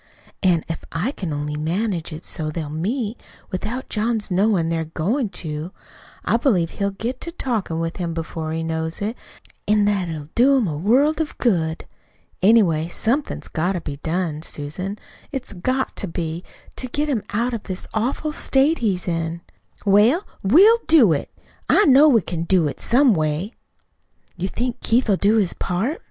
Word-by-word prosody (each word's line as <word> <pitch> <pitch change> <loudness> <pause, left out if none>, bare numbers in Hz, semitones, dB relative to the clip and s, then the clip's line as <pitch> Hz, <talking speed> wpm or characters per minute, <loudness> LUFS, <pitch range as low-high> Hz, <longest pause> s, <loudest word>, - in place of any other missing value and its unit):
"An' 175 -4 +3
if 165 - -5
I 180 +11 -1
can 185 - -5
only 150 0 -3
manage 170 +3 -1
it 155 +2 -7
so 155 -3 -3
they'll 155 -1 -4
meet 215 - -2 0.3
without 215 +7 -4
John's 215 -1 -1
knowin' 185 -3 +2
they're 165 -1 -1
goin' 205 - -1
to, 155 -1 -5 0.5
I - - +3
believe 195 - +1
he'll 200 -1 -1
get 225 +6 -5
to 335 - -5
talkin' 225 - -2
with 165 0 -3
him 170 -3 -3
before 160 -1 -4
he 165 0 -2
knows 160 0 -2
it; 215 +3 -2 0.5
an' 210 -1 +4
that 200 -4 +1
it'll 155 -2 -6
do 270 +3 +5
him 235 -6 +1
a 155 - -2
world 265 - +3
of 310 - -4
good. 165 -9 0 0.6
Anyway, 185 -7 +4
somethin's 245 - -1
got 175 +4 -1
to 180 - -3
be 145 -3 -6
done, 160 0 -2
Susan 175 +7 -5 0.3
it's 260 -5 -4
GOT 255 +9 -1
to 200 - -2
be 165 0 -4 0.3
to 255 - -3
get 290 +4 -1
him 260 -7 0
out 235 +4 0
of 230 - -3
this 185 -1 -5
awful 255 +7 -1
state 295 +1 +2
he's 195 -6 -1
in." 165 0 -2 0.4
"Well, 215 - +4 0.2
we'll 385 - +6
do 260 - +6
it. 140 - -3 0.4
I 415 - +5
know 285 +1 +7
we 235 -6 +5
can 170 -1 -3
do 175 -3 +3
it 145 - -5
some 250 0 +4
way." 155 +6 -1 0.8
"You 185 - -2
think 245 +4 -3
Keith'll 230 -2 +2
do 205 +4 +3
his 200 -5 +2
part?" 215 - -2
195 Hz, 175 wpm, -22 LUFS, 165-240 Hz, 0.8 s, know